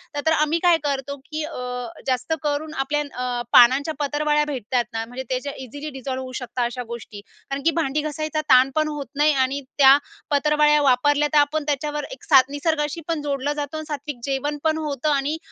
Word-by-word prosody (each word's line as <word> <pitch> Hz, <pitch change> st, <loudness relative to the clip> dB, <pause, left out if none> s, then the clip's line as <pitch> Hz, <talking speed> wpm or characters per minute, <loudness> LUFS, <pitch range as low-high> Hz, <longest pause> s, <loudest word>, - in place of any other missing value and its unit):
तर-तर 290 Hz, +2 st, +1 dB
आम्ही 315 Hz, +1 st, +2 dB
काय 350 Hz, -2 st, +5 dB
करतो 280 Hz, -1 st, -2 dB
की 310 Hz, 0 st, -4 dB
अ, 250 Hz, -5 st, -5 dB, 0.2 s
जास्त 255 Hz, +4 st, 0 dB
करून 300 Hz, +1 st, -2 dB
आपल्या 295 Hz, +1 st, -1 dB
अ, 250 Hz, -4 st, -3 dB
पानांच्या 265 Hz, +6 st, +6 dB
पत्रावळ्या 295 Hz, +1 st, +1 dB
भेटतात 250 Hz, -3 st, -1 dB
ना? 225 Hz, 0 st, -2 dB
म्हणजे 245 Hz, +3 st, -7 dB
ते 255 Hz, -1 st, 0 dB
जे 285 Hz, -, -4 dB
इझिली 285 Hz, +5 st, -7 dB
डिझॉल्व्ह 260 Hz, -1 st, -5 dB
होऊ 255 Hz, -, -8 dB
शकतात 245 Hz, 0 st, -2 dB
अशा 245 Hz, +1 st, -4 dB
गोष्टी. 225 Hz, -3 st, -8 dB, 0.3 s
कारण 275 Hz, 0 st, -3 dB
की 330 Hz, -, +5 dB
भांडी 300 Hz, -1 st, 0 dB
घासायचा 310 Hz, +1 st, -3 dB
ताण 255 Hz, +1 st, +7 dB
पण 310 Hz, 0 st, +2 dB
होत 295 Hz, -2 st, -4 dB
नाही 295 Hz, +1 st, +4 dB
आणि 270 Hz, +1 st, 0 dB, 0.2 s
त्या 275 Hz, 0 st, +8 dB, 0.3 s
पत्रावळ्या 300 Hz, +1 st, +3 dB
वापरल्या, 290 Hz, +2 st, +3 dB
तर -, -, +5 dB
आपण 295 Hz, +1 st, +2 dB
त्याच्यावर 295 Hz, +1 st, -1 dB
एक -, -, -10 dB
साथ 270 Hz, -4 st, +6 dB
निसर्गाशी 295 Hz, +1 st, -1 dB
पण 330 Hz, -3 st, -1 dB
जोडलं 285 Hz, 0 st, -1 dB
जातं 295 Hz, +1 st, -4 dB
आणि 310 Hz, -, -6 dB
सात्विक 290 Hz, -3 st, -5 dB
जेवण 280 Hz, +2 st, -2 dB
पण 315 Hz, -1 st, +2 dB
होतं. 300 Hz, -2 st, -2 dB
आणि 285 Hz, +3 st, 0 dB
290 Hz, 195 wpm, -23 LUFS, 260-300 Hz, 0.3 s, त्या